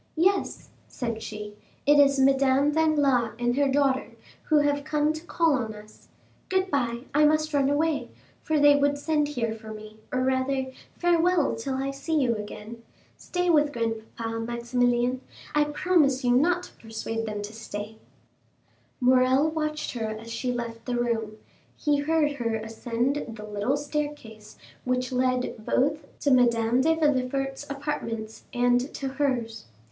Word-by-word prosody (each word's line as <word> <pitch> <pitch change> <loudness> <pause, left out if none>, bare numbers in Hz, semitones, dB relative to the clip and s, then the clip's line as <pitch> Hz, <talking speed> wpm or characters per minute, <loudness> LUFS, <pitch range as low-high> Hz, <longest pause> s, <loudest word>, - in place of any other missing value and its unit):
"Yes," 380 +4 +1 0.2
said 230 -3 -4
she, 210 -1 -7 0.3
"it 290 +1 +6
is 280 -1 +5
Madame 270 +1 +4
Danglars 290 -8 +2
and 240 0 0
her 285 0 +3
daughter, 270 -1 +1 0.3
who 310 - +3
have 290 -1 +2
come 300 0 +1
to 315 +1 -8
call 330 -2 +2
on 225 -5 -2
us. 210 0 -15 0.4
Good 375 0 0
bye;—I 260 +2 0
must 310 +1 +2
run 280 -1 +3
away, 305 +1 0 0.3
for 315 -1 0
they 290 0 +7
would 285 0 +2
send 300 0 +1
here 235 -6 -2
for 220 -1 -10
me, 215 0 -10
or, 255 - 0
rather, 260 0 0 0.3
farewell 345 -2 +2
till 260 +4 -3
I 270 +1 -2
see 280 +4 -3
you 245 -4 +2
again. 215 +2 -8 0.3
Stay 360 -1 -1
with 295 -2 +3
grandpapa, 225 -1 -3
Maximilian; 240 +2 0 0.3
I 300 0 +3
promise 295 -4 +2
you 245 - +3
not 350 +7 +3
to - - -12
persuade 225 0 -4
them 210 -1 -4
to 210 +1 -7
stay." 220 -1 -7 1.1
40274m - - +1
Morrel 260 +4 +4
watched 305 -1 -2
her 225 -3 -3
as 215 +1 -7
she 250 +2 -2
left 235 -2 -5
the 250 - -2
room; 225 -3 -1 0.4
he 295 -2 +1
heard 300 0 +2
her 230 -3 -1
ascend 230 +5 -2
the 215 -1 -8
little 210 +6 -1
staircase 290 -8 -5 0.3
which 250 0 -1
led 255 -3 0
both 290 +6 0
to 285 - +2
Madame 240 -1 +3
de 320 +4 +3
Villefort's 270 -2 0
apartments 230 -6 -4
and 245 +2 +2
to 275 - -3
hers. 260 - -2
260 Hz, 155 wpm, -26 LUFS, 230-295 Hz, 1.1 s, they